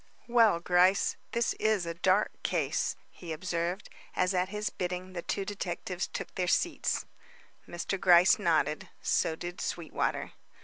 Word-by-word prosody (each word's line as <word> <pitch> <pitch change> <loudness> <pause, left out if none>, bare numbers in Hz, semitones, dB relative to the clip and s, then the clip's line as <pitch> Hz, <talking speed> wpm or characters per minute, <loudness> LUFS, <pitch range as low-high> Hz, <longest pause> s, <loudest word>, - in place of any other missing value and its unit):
"Well, 230 -7 +5
Gryce, 180 +2 +3 0.2
this 235 0 +1
is 215 -5 +2
a 170 - -3
dark 185 +4 +1
case," - - 0 0.2
he 170 -2 -9
observed, 175 +3 -2 0.3
as 180 +1 +2
at 180 0 +1
his 210 +1 -3
bidding 180 +1 -4
the 175 - -4
two 195 +3 -2
detectives 185 -2 -3
took - - -6
their 180 -1 -1
seats. 345 - 0 0.6
Mr. 175 +3 -3
Gryce 180 0 +6
nodded; 155 -3 +1
so 160 - +1
did 175 +2 -6
Sweetwater. 170 -2 -2
180 Hz, 140 wpm, -30 LUFS, 170-195 Hz, 0.6 s, Gryce